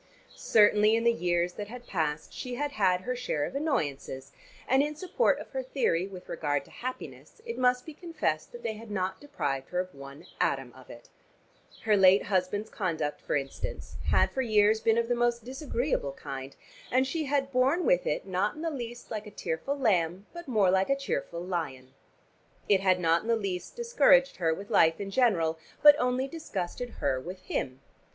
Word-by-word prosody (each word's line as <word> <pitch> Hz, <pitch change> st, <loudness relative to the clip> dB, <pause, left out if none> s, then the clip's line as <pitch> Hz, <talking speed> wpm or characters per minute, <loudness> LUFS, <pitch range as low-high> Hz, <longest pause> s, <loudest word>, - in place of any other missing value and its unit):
Certainly 210 Hz, 0 st, +4 dB
in 230 Hz, -, 0 dB
the 235 Hz, 0 st, +4 dB
years 175 Hz, -3 st, 0 dB
that 205 Hz, +2 st, -6 dB
had 245 Hz, +2 st, -10 dB
passed 155 Hz, -6 st, -2 dB
she 250 Hz, -1 st, -5 dB
had 290 Hz, +3 st, -2 dB
had 185 Hz, -7 st, +2 dB
her 250 Hz, +6 st, -3 dB
share 240 Hz, -12 st, -1 dB
of -, -, -6 dB
annoyances, 140 Hz, -, -2 dB, 0.4 s
and 265 Hz, +1 st, +4 dB
in 300 Hz, +1 st, -1 dB
support 370 Hz, +9 st, +1 dB
of -, -, -9 dB
her 265 Hz, -, -2 dB
theory 235 Hz, -9 st, 0 dB
with 185 Hz, -2 st, -11 dB
regard 145 Hz, -4 st, -1 dB
to -, -, -19 dB
happiness 255 Hz, -, -7 dB
it 465 Hz, -, -4 dB
must 250 Hz, 0 st, +2 dB
be 315 Hz, -, -8 dB
confessed 320 Hz, -, -3 dB
that 240 Hz, -, -10 dB
they 225 Hz, -, -1 dB
had 220 Hz, +1 st, -11 dB
not 190 Hz, -2 st, -2 dB
deprived 140 Hz, -, -3 dB
her 180 Hz, -, -1 dB
of 185 Hz, 0 st, -3 dB
one 140 Hz, +1 st, -11 dB
atom 135 Hz, -3 st, 0 dB
of 130 Hz, -1 st, -16 dB
it. 120 Hz, -, -12 dB, 0.7 s
Her 215 Hz, -1 st, +4 dB
late 190 Hz, 0 st, +6 dB
husband's 195 Hz, +3 st, -1 dB
conduct, 160 Hz, -7 st, -2 dB
for -, -, -2 dB
instance, 135 Hz, -1 st, -5 dB
had -, -, +3 dB
for 265 Hz, -, -1 dB
years 215 Hz, -2 st, +4 dB
been 225 Hz, 0 st, +2 dB
of 235 Hz, 0 st, +1 dB
the 245 Hz, -, +1 dB
most 240 Hz, -1 st, 0 dB
disagreeable 255 Hz, -, -2 dB
kind, 135 Hz, 0 st, -7 dB, 0.4 s
and 260 Hz, +1 st, +3 dB
she 310 Hz, +4 st, -2 dB
had 275 Hz, -1 st, 0 dB
borne 270 Hz, +7 st, +2 dB
with -, -, +3 dB
it -, -, -1 dB
not 190 Hz, +2 st, -1 dB
in 310 Hz, -, -7 dB
the 330 Hz, -, -1 dB
least 240 Hz, -4 st, -7 dB
like 215 Hz, -1 st, -4 dB
a -, -, -7 dB
tearful 205 Hz, -, -3 dB
lamb 190 Hz, -6 st, +1 dB
but 345 Hz, -1 st, -9 dB
more 210 Hz, -7 st, +3 dB
like 190 Hz, 0 st, +2 dB
a 275 Hz, -, +4 dB
cheerful 170 Hz, -, -3 dB
lion. 145 Hz, -8 st, -4 dB, 0.7 s
It 200 Hz, -2 st, +4 dB
had 185 Hz, -1 st, +3 dB
not 165 Hz, -1 st, +3 dB
in -, -, -10 dB
the 230 Hz, -, +3 dB
least 195 Hz, -5 st, -4 dB
discouraged 285 Hz, -, +4 dB
her 165 Hz, -3 st, +1 dB
with 200 Hz, +7 st, -5 dB
life 165 Hz, -6 st, +4 dB
in 200 Hz, -1 st, -5 dB
general, 175 Hz, -10 st, +2 dB, 0.2 s
but 295 Hz, 0 st, +11 dB
only 250 Hz, +1 st, +1 dB
disgusted 245 Hz, -, -5 dB, 0.2 s
her 135 Hz, -2 st, +2 dB
with 185 Hz, +6 st, -8 dB
him. 130 Hz, -7 st, -3 dB
210 Hz, 195 wpm, -29 LUFS, 170-255 Hz, 0.7 s, but